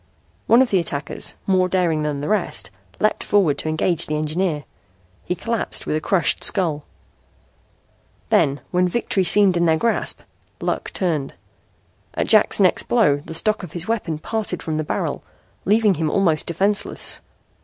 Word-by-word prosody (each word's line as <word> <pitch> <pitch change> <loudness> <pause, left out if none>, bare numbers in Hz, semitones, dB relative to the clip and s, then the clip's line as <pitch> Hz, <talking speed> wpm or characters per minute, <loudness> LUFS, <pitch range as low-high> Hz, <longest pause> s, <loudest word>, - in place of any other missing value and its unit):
One 240 +3 +6
of 255 - -4
the 190 - +3
attackers, 150 -3 -2
more 185 -1 +2
daring 175 -5 +1
than 150 -2 -2
the 145 - -4
rest, 215 0 -1 0.3
leaped 215 - 0
forward 190 -8 +2
to 155 - -2
engage 160 +2 0
the 150 - -2
engineer. 155 0 -1 0.6
He 180 - -2
collapsed 230 +6 -2
with - - -1
a 155 - -1
crushed 180 -2 +1
skull. 160 -7 +2 1.4
Then, 140 +1 +2
when 180 0 +2
victory 195 -1 0
seemed 190 -1 +5
in 170 0 +2
their 160 0 +3
grasp, 230 +7 0 0.4
luck - - -3
turned. 155 -7 -2 0.8
At - - 0
Jack's - - +4
next - - +2
blow 140 -1 +3
the 150 +3 -9
stock 215 +6 0
of 175 -5 -9
his 175 0 -4
weapon 200 -9 -2
parted 200 +1 -3
from 155 -1 -3
the 155 - -1
barrel, - - -3 0.4
leaving 210 +1 +3
him 160 -2 -1
almost 165 -4 +1
defenseless. 200 +4 -2
175 Hz, 160 wpm, -21 LUFS, 155-200 Hz, 1.4 s, One